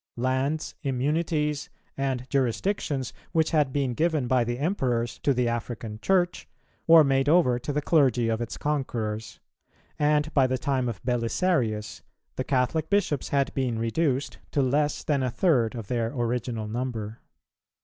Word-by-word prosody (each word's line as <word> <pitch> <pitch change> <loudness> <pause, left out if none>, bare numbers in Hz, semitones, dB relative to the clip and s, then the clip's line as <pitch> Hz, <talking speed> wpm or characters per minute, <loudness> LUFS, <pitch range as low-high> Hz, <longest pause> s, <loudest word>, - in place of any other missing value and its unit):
Lands, 130 +5 -1
immunities, 150 +2 -1 0.3
and 130 -2 -2
jurisdictions, 135 - -1 0.2
which 160 -2 +2
had 150 -4 +2
been 135 -2 0
given 155 -1 +1
by 125 0 +2
the 120 +1 -2
Emperors 125 -7 -1
to 140 - +1
the 125 -2 +1
African 115 -2 -4
Church, 180 +4 +1 0.4
were 165 -1 +9
made 135 0 +2
over 140 -8 +4
to 145 - -4
the 150 0 -1
clergy 130 -8 +3
of 115 0 0
its 115 - -4
conquerors; 115 -7 -3 0.6
and 150 +1 +2
by 135 -3 +4
the 130 0 0
time 130 -1 0
of 105 -6 -7
Belisarius, 120 -2 0 0.3
the 130 - -2
Catholic 135 +5 0
Bishops 200 -9 0
had 140 -1 +1
been 125 -4 -1
reduced 130 +4 -1
to 140 - +2
less 145 +3 +1
than 145 -3 +1
a 130 - 0
third 125 - +2
of 115 -3 -5
their 115 -1 -1
original 120 -3 -2
number. 115 -2 -4
130 Hz, 150 wpm, -26 LUFS, 120-150 Hz, 0.6 s, were